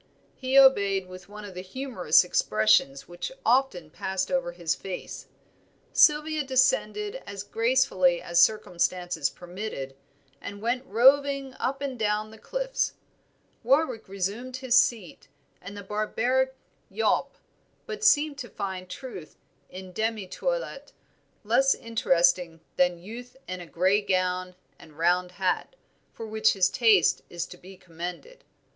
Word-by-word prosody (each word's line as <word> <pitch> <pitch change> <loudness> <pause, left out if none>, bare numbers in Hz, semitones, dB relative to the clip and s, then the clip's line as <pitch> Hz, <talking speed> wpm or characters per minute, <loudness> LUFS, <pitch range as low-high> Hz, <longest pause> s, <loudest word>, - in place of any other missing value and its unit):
He 260 +1 0
obeyed 200 -8 +5
with 185 +1 -12
one 210 0 -9
of 200 - -9
the 180 - -6
humorous 190 - +2
expressions 110 -3 +2
which 175 - -6
often 235 - +1
passed 190 +2 -3
over 265 -10 0
his 170 -2 -2
face. 190 -2 -7 0.7
Sylvia 305 0 +4
descended 415 - +1
as 200 -1 -6
gracefully 225 -6 +2
as 170 0 +2
circumstances 180 -6 +1
permitted, 175 -7 -7 0.5
and 200 0 -7
went 250 +4 -2
roving 275 +3 +3
up 275 +2 -2
and 265 -4 -4
down 215 0 -1
the 220 - -14
cliffs. - - -2 0.7
Warwick 260 -1 +1
resumed 205 +7 -4
his 260 -2 0
seat 225 -8 +1 0.3
and 200 +3 -9
the 200 - -7
"barbaric 245 +6 0 0.3
yawp," - - 0 0.5
but 435 -1 -6
seemed 295 -8 +3
to 240 - -7
find 185 -2 -5
Truth 185 - -9 0.3
in 185 0 -10
demi 220 +1 -2
toilet - - -4 0.5
less 255 +6 +3
interesting 175 -6 +1 0.2
than 180 -1 +2
Youth 245 +5 -10
in 185 0 -5
a 175 - -10
gray 185 +5 +2
gown 185 -2 -1 0.2
and 150 -2 -16
round 180 +2 +1
hat, 190 - -2 0.4
for 225 - -8
which 220 0 +2
his 190 -2 +2
taste 220 -8 +4
is 175 0 -4
to - - -12
be 185 +2 -14
commended. 180 - -8
205 Hz, 135 wpm, -26 LUFS, 180-260 Hz, 0.7 s, obeyed